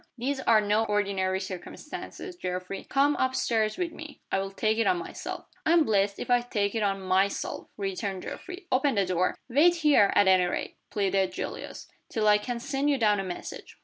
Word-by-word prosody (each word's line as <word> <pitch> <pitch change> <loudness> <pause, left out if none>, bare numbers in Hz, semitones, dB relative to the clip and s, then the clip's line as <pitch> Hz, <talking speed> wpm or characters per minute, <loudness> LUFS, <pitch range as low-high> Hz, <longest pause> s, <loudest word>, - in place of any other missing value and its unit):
These 265 +3 -2
are 225 -4 +4
no 210 +1 +2
ordinary 195 -3 0
circumstances, 195 - -7
Geoffrey. 185 - -5
Come 285 +2 +3
up 260 0 +1
stairs 220 -1 +1
with 355 -2 -2
me 310 -2 -10
I'll 195 0 0
take 215 +3 0
it 230 - +2
on 365 - +3
myself." 365 +1 -6 0.2
"I'm 330 0 +5
blessed 200 -5 +1
if - - -4
I 245 0 +5
take 205 -4 -1
it 225 - -1
on 200 -1 +1
_my_self!" 190 +1 0
returned 195 -1 -3
Geoffrey. 370 +1 -8
"Open 270 +1 +2
the 200 -1 +2
door!" 180 0 0
"Wait 300 +8 +5
here, 295 -11 +4
at 205 - +5
any 185 -1 +5
rate," 180 - -3
pleaded 195 -2 0
Julius, - - -6 0.2
"till 215 -1 0
I 210 0 +6
can 240 +2 -4
send 275 +3 -1
you 285 - +3
down 210 -4 +3
a - - -1
message." 180 -2 -7
215 Hz, 190 wpm, -28 LUFS, 195-275 Hz, 0.2 s, I